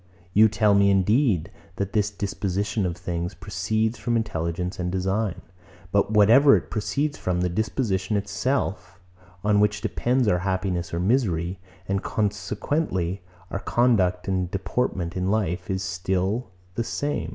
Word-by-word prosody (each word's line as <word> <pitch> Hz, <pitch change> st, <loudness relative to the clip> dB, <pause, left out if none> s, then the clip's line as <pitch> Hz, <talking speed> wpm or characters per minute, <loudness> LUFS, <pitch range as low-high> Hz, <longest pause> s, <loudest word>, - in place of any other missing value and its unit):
You 110 Hz, +2 st, +6 dB
tell 105 Hz, -1 st, +3 dB
me, 100 Hz, 0 st, +5 dB
indeed, 100 Hz, -, +2 dB, 0.2 s
that 100 Hz, 0 st, -3 dB
this 105 Hz, -2 st, +2 dB
disposition 100 Hz, 0 st, -2 dB
of 85 Hz, -1 st, -4 dB
things 90 Hz, 0 st, -4 dB
proceeds 100 Hz, +5 st, -1 dB
from 120 Hz, -1 st, 0 dB
intelligence 90 Hz, -3 st, -2 dB
and 90 Hz, 0 st, -1 dB
design. 95 Hz, +1 st, -1 dB, 0.5 s
But 100 Hz, 0 st, +2 dB
whatever 115 Hz, +7 st, +6 dB
it -, -, -7 dB
proceeds 140 Hz, +7 st, -1 dB
from, 90 Hz, -1 st, -1 dB
the 90 Hz, -, +1 dB
disposition 100 Hz, 0 st, -1 dB
itself, 100 Hz, -3 st, -2 dB, 0.4 s
on 105 Hz, 0 st, +3 dB
which 105 Hz, 0 st, +2 dB
depends 125 Hz, 0 st, +1 dB
our 90 Hz, -3 st, +3 dB
happiness 95 Hz, -1 st, -2 dB
or 85 Hz, -, -2 dB
misery, 90 Hz, -4 st, 0 dB, 0.3 s
and 95 Hz, 0 st, 0 dB
consequently 100 Hz, -, -1 dB, 0.3 s
our 100 Hz, -, -2 dB
conduct 100 Hz, -7 st, +2 dB
and 95 Hz, -2 st, 0 dB
deportment 95 Hz, -2 st, -2 dB
in 90 Hz, 0 st, -1 dB
life 100 Hz, -5 st, -1 dB
is 95 Hz, 0 st, -1 dB
still 95 Hz, +6 st, -1 dB, 0.2 s
the 115 Hz, -, -1 dB
same. 145 Hz, +5 st, -2 dB
100 Hz, 140 wpm, -25 LUFS, 90-110 Hz, 0.5 s, You